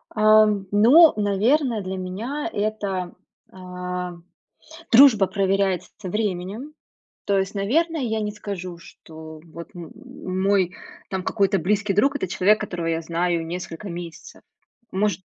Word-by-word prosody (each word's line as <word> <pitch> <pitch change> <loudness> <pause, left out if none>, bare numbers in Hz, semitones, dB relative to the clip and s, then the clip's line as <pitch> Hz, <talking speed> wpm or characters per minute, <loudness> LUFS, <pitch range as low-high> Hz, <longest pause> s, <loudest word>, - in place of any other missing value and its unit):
Ам, 215 -2 +4
ну, 260 +11 +7
наверное, 220 +4 +1
для 190 0 -4
меня 220 +11 -4
это, 205 -4 -3 0.4
а, 180 -1 -6 0.8
дружба 230 -6 +7
проверяется 195 -1 0 0.2
временем. 210 +7 -3 0.5
То 200 -1 +1
есть, 190 +1 -2
наверное, 310 +10 0
я 220 -3 -1
не 210 0 -2
скажу, 185 -4 -7
что 160 -1 -12
вот 170 +1 -11
м 170 -3 -9 0.3
мой 190 0 +1 0.4
там 190 -1 -3
какой-то 195 0 +1
близкий 205 +3 0
друг- 275 +8 +2
это 225 - -2
человек, 200 +4 +2
которого 175 -5 -4
я 165 0 -1
знаю 170 0 -1
несколько 175 +3 -7
месяцев. 170 -2 -9 0.5
Может 200 0 -1
195 Hz, 125 wpm, -23 LUFS, 180-215 Hz, 0.8 s, ну